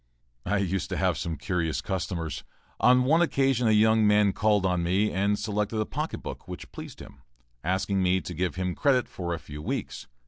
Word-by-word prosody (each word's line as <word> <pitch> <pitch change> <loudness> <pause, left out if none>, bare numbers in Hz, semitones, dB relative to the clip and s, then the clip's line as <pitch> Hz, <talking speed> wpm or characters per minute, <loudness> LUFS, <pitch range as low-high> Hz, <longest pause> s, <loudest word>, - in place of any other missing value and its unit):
I 105 +3 +2
used 95 -2 -1
to - - -2
have - - +1
some 85 -1 -3
curious 85 -3 -1
customers. 90 -4 -3 0.4
On 125 +1 +5
one 160 +6 +4
occasion 135 -6 +2
a - - +4
young 110 0 +4
man 105 -1 +4
called 105 -2 +2
on 90 -2 +1
me 95 +5 +1
and 100 +2 +1
selected 105 +1 -2
a 110 - +1
pocket - - -4
book - - -7
which - - -8
pleased - - -9
him, 65 - -13 0.4
asking 95 +3 0
me 95 0 +3
to 90 - -7
give 90 +2 -2
him 90 0 -2
credit 130 0 +2
for 85 -2 -5
a 85 - -1
few 75 -1 -9
weeks. - - -4
100 Hz, 200 wpm, -27 LUFS, 90-110 Hz, 0.4 s, On